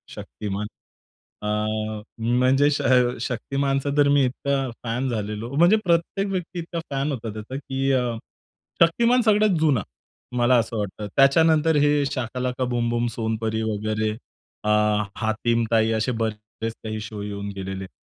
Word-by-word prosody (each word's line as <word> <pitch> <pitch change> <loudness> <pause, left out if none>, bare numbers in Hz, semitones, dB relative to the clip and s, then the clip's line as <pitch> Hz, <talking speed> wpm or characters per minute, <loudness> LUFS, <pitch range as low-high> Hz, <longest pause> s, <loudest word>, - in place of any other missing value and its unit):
शक्तिमान. 105 0 -5 0.7
अ, 110 0 -2 0.2
म्हणजे 130 +5 +3
श 145 - 0 0.4
शक्तिमानचा 135 +4 -1
तर 145 - +5
मी 140 -1 +4
इतका 135 +1 -1
फॅन 125 +3 -1
झालेलो. 105 0 -3
म्हणजे 175 +7 +6
प्रत्येक 170 +4 +1
व्यक्ती 180 -1 -3
इतका 170 0 -4
फॅन 140 +2 -1
होता 115 -4 -4
त्याचा, 110 +5 -7
की 135 -1 -1
अ, 125 -3 +1 0.7
शक्तिमान 235 +9 +4
सगळ्यात 215 -4 +3
जुना, 145 -8 +3 0.6
मला 120 +1 +4
असं 115 -1 -1
वाटतं. 105 +1 -4
त्याच्यानंतर 160 +3 +4
हे 145 -1 +3
शाकालाका 125 0 -2
बूम-बूम, 120 0 0
सोनपरी 110 -1 -1
वगैरे, 110 0 -1 0.5
अ, 105 - -1 0.5
हातीम 115 +1 0
ताई 115 0 +3
असे 115 +4 0
बरेच 110 +1 -4
काही 110 -1 -4
शो 105 -1 -7
येऊन 100 0 -5
गेलेले 95 0 -5
आहेत. 95 - -9
120 Hz, 135 wpm, -24 LUFS, 110-140 Hz, 0.7 s, म्हणजे